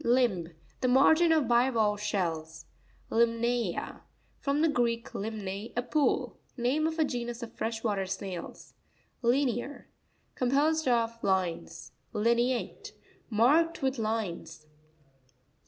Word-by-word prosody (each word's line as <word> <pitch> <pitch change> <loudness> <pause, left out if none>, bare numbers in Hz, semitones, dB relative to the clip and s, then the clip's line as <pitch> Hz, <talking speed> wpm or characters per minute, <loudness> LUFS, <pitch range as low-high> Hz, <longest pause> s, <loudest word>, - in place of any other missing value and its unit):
Lims.—The 195 - 0
margin 315 +6 +5
of 310 -6 +3
bivalve 230 -4 +2
shells. 160 -6 -2 0.5
Limna'a.—From 235 - -1
the - - +5
Greek, 235 -5 0
limne, 205 0 -5
a - - +3
pool. 290 +4 0 0.2
Name 265 +6 +1
of 320 0 -3
a 315 - +3
genus 240 -2 -4
of 230 - -8
fresh 225 0 -3
water 200 -4 0
snails. 190 -2 -6 0.5
Li'near.—Composed 270 +3 -1
of 230 -1 +1
lines. 180 -3 -1 0.2
Li'neaTE.— 235 +3 0 0.4
Marked 285 +9 +3
with 265 -1 0
lines. 190 -8 -3
235 Hz, 100 wpm, -29 LUFS, 205-260 Hz, 0.5 s, margin